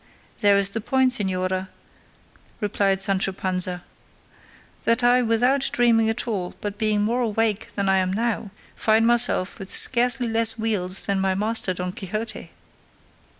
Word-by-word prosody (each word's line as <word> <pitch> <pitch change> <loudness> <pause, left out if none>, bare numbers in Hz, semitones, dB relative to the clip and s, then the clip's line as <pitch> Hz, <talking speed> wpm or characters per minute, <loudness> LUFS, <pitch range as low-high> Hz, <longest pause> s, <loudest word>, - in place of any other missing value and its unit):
"There 205 -2 +4
is 200 0 +2
the 225 - -4
point, 260 +3 +1
señora," 185 -3 -2 0.9
replied 195 -2 0
Sancho 195 0 0
Panza, 185 -1 -1 1.0
"that 230 +2 +1
I 245 +1 +4
without 245 +4 +1
dreaming 230 -2 +2
at 225 +2 -3
all, 190 -6 -4
but 205 0 -6
being 215 -1 +1
more 235 +4 0
awake 225 -2 -1
than 200 -1 -2
I 190 0 +3
am 185 0 -1
now, 225 0 -2 0.3
find 220 +1 +2
myself 235 -5 +1
with 195 -1 -9
scarcely 245 0 +4
less 225 0 +2
wheals 195 -4 -1
than 195 -1 -1
my 190 0 0
master, 210 -2 0
Don 180 0 -4
Quixote." 215 +5 -6
210 Hz, 150 wpm, -23 LUFS, 190-230 Hz, 1.0 s, There